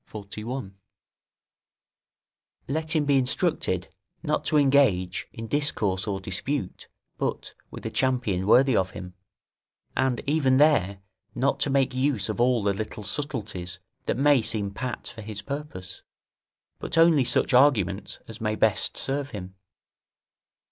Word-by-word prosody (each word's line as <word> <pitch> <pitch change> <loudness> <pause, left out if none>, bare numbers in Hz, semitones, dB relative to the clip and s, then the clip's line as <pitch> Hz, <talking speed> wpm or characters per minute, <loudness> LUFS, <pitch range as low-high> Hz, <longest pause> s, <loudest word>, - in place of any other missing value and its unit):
41.] 105 +1 -6 1.9
Let 160 +4 -2
him 150 -2 +2
be 140 -1 +4
instructed 125 0 0 0.4
not - - 0
to 155 - +2
engage 130 -11 +3
in 115 - -7
discourse 110 -9 +1
or 100 -2 -2
dispute 95 +4 -4 0.3
but - - -3 0.2
with - - -10
a - - -3
champion 120 -8 0
worthy 130 +2 +5
of 95 -2 +2
him, 90 -1 -9 0.8
and, 130 -2 +1
even 140 -3 +2
there, 110 -10 +3 0.3
not 135 +2 +1
to - - +1
make 135 -1 +2
use 130 -6 0
of - - -1
all 120 -3 +3
the 100 0 +2
little 110 +1 -5
subtleties 100 - -3 0.3
that - - 0
may 145 -2 +4
seem 105 -2 -1
pat 125 +4 -5
for 110 - -10
his 105 -1 -7
purpose, 140 -11 -6 0.8
but 165 - -3
only 165 -4 +6
such 125 +1 +2
arguments 110 -8 +3
as 115 -1 -10
may 110 -1 0
best 110 -1 +2
serve 140 +1 -1
him. 95 -5 -8
120 Hz, 135 wpm, -26 LUFS, 100-140 Hz, 1.9 s, only